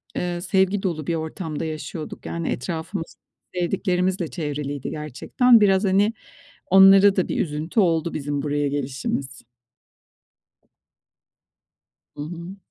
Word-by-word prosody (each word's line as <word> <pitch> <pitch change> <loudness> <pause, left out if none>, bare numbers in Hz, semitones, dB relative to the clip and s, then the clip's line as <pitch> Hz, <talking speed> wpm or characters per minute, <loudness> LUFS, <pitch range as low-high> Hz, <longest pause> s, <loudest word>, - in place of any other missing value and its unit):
eee, 175 -1 -2
sevgi 190 +2 +1
dolu 160 -6 -2
bir 170 - 0
ortamda 160 0 -4
yaşıyorduk. 155 0 -6
Yani, 170 -1 -3
etrafımız 165 +5 -4 0.4
sevdiklerimizle 180 0 0
çevriliydi 145 -4 -4
gerçekten. 185 - +2
Biraz, 195 0 +4
hani, 200 +3 +3 0.5
onlara 195 +1 +7
da 185 - +1
bir - - -1
üzüntü 155 +6 -2
oldu 170 -3 +2
bizim 145 -1 -2
buraya 145 0 0
gelişimiz. 140 -1 -3 2.7
Hı - - -9
hı. 170 +4 -7
170 Hz, 110 wpm, -23 LUFS, 150-190 Hz, 2.7 s, onlara